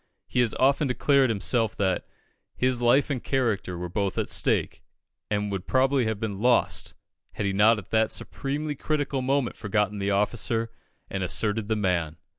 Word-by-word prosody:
He - - -2
has 120 -3 +2
often 140 +3 +3
declared 135 +1 +3
himself 115 +2 0
that 95 -2 -1 0.5
"his 125 -1 +1
life 125 +5 +3
and 130 -4 -3
character 110 -9 -1
were 90 +1 -4
both 100 +1 -2
at - - -1
stake, - - 0 0.5
and 105 -1 -1
would 95 -2 -4
probably 130 -1 +2
have 110 -2 -2
been 105 -3 -4
lost, 120 0 +1 0.4
had 105 - -3
he 100 - 0
not 110 +3 +5
at 100 - -10
that 110 -1 +2
supremely 145 +2 -2
critical 145 -1 -2
moment 135 -1 0
forgotten 105 -1 -1
the 100 0 -1
officer 115 +3 0 0.4
and 95 - -3
asserted 105 +3 0
the 110 - +1
man." 90 -6 -1
110 Hz, 170 wpm, -26 LUFS, 100-130 Hz, 0.5 s, not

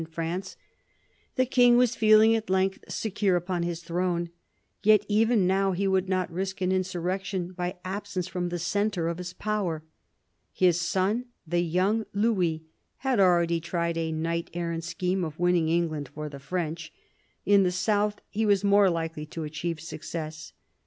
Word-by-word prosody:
in - - -4
France. 170 +4 -4 0.8
The 255 - +3
king 245 -1 +5
was 245 -1 +4
feeling 220 0 +6
at 225 -2 -3
length 190 +1 +1
secure 200 -3 0
upon 175 0 -1
his 170 0 -3
throne. 175 0 -1 0.5
Yet 210 -1 +5
even 215 -1 +3
now 195 +1 +2
he 195 +2 0
would 190 -1 +1
not 185 -2 0
risk 190 +2 -3
an 185 0 0
insurrection 185 0 -2
by 180 0 -4
absence 190 -1 -3
from 180 -1 -3
the 175 - -3
centre 185 0 0
of 170 +1 -3
his 180 0 -6
power. 185 -6 -2 0.7
His 180 -2 +2
son, 190 +7 0 0.2
the 175 +2 0
young 185 +6 +1
Louis, 185 -7 +1 0.3
had 265 -5 0
already 170 -3 +4
tried 170 0 -2
a 165 -1 -1
knight 165 +1 -2
errant 170 -1 -2
scheme 185 +1 -1
of 155 -2 -5
winning 175 -2 +2
England 160 -4 0
for 150 +1 -6
the 140 -1 -9
French. 160 +1 -4 0.5
In 200 0 +5
the 180 -2 +2
south 205 +3 0
he 220 +1 -2
was 205 -2 +3
more 200 -1 +5
likely 165 -2 -3
to 160 +1 -6
achieve 155 +2 -4
success. 160 0 -7
180 Hz, 165 wpm, -27 LUFS, 170-200 Hz, 0.8 s, feeling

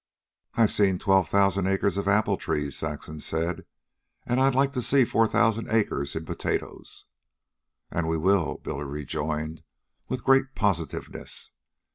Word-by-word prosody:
"I've 115 -2 +4
seen 95 -3 +3
twelve 95 0 +2
thousand 100 -1 +2
acres 95 +1 +1
of 100 0 -2
apple 105 +2 +3
trees," 75 -2 -2
Saxon 75 +1 -5
said. 80 +3 -2 0.6
"And 120 +1 +1
I'd 135 -1 +3
like 135 +1 +2
to 125 - -1
see 130 +1 +4
four 115 0 +2
thousand 115 0 +1
acres 105 -10 0
in 80 0 -4
potatoes." - - -4 0.9
"And 85 -1 -1
we 80 0 0
will," 95 +1 +2
Billy 70 +2 -4
rejoined 75 +2 -4 0.5
with 130 -1 -4
great 135 0 +3
positiveness. 85 -8 -2
95 Hz, 140 wpm, -26 LUFS, 80-115 Hz, 0.9 s, I've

